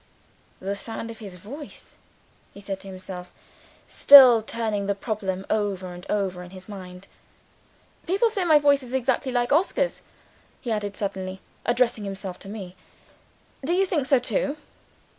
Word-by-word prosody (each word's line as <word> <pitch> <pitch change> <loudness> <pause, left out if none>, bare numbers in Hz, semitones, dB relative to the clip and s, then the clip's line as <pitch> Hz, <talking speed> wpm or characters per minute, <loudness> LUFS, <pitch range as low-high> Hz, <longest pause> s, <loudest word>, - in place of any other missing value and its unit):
"The 195 +2 -3
sound 225 +2 -6
of 225 - -12
his 200 -5 -9
voice!" 265 - -10 0.6
he - - -10
said 195 -1 -5
to 195 - -12
himself, 185 -1 -8 0.5
still 260 -5 +9
turning 215 -3 -2
the 200 - +1
problem 195 -3 -3
over 195 -4 -1
and 175 0 -11
over 190 -3 -1
in 180 - -10
his 185 0 -12
mind. 185 -2 -9 1.0
"People 400 +6 +2
say 400 -4 -1
my 315 -3 +6
voice 285 -1 +4
is 255 0 -6
exactly 260 +1 0
like 245 +1 0
Oscar's," 380 +9 +1 0.6
he 240 - -4
added, 205 -2 -2
suddenly 190 -2 -4 0.3
addressing 240 -2 +2
himself 195 -2 -6
to 195 - -10
me. 195 -4 -7 0.9
"Do 320 +6 0
you 385 +2 +3
think 305 -8 -1
so 275 - +5
too?" 250 +4 -1
210 Hz, 155 wpm, -25 LUFS, 190-260 Hz, 1.0 s, still